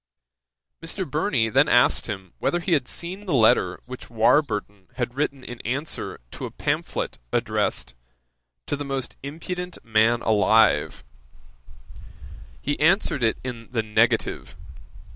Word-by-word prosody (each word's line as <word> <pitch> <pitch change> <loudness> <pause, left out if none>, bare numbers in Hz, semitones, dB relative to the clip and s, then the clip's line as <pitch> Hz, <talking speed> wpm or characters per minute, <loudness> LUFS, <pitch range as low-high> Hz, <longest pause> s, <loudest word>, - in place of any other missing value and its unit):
Mr. 175 +3 -4
Burney 140 - +1
then 135 +6 +4
asked 120 0 +4
him 95 -5 -6
whether 175 - +1
he 175 +2 -3
had 135 -5 +2
seen 190 +4 -6
the 165 - +1
letter 110 -6 +4
which 130 0 -9
Warburton 110 -5 +1
had 120 -1 -2
written 140 -1 -2
in 120 -1 -8
answer 140 +7 -3
to - - -5
a - - -8
pamphlet - - -2
addressed - - -1 0.7
"To - - -1
the 145 - -5
most 135 -2 -4
impudent 175 +5 -5
Man 115 +1 +3
alive." 110 +1 +3 1.6
He 145 +1 -1
answered 165 -3 +3 0.2
in 120 -3 -6
the 115 -2 +1
negative. 115 +2 +1
130 Hz, 125 wpm, -24 LUFS, 110-150 Hz, 1.6 s, then